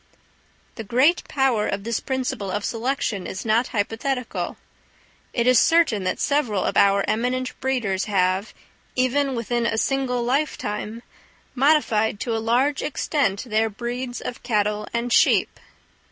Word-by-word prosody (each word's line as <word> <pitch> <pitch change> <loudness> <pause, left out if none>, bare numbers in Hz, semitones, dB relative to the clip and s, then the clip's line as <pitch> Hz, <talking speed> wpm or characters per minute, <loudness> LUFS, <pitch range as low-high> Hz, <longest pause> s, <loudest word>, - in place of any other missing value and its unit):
The 225 - -5
great 255 - +3
power 265 -7 +1
of 200 0 -3
this 230 +1 -1
principle 255 -7 -3
of 205 +2 -2
selection 230 -4 -2
is 190 - -6
not 225 +3 +2
hypothetical. 230 +4 -2 0.7
It 235 - 0
is 250 -2 +6
certain 320 - +3
that 185 - -1
several 250 -10 +1
of - - -1
our 200 0 +4
eminent 250 +3 -1
breeders 235 -8 -1
have, 190 0 +1 0.4
even 260 +2 +1
within 235 0 -1
a 225 - -1
single 250 -1 0
lifetime, 235 -4 -2 0.5
modified 245 -7 +2
to 230 -2 -1
a 225 - -1
large 255 +5 +1
extent 280 -9 -1
their 220 -1 +1
breeds 245 +3 -5
of 245 - -6
cattle 210 -2 0
and 235 0 -1
sheep. - - +3
235 Hz, 140 wpm, -23 LUFS, 210-260 Hz, 0.7 s, is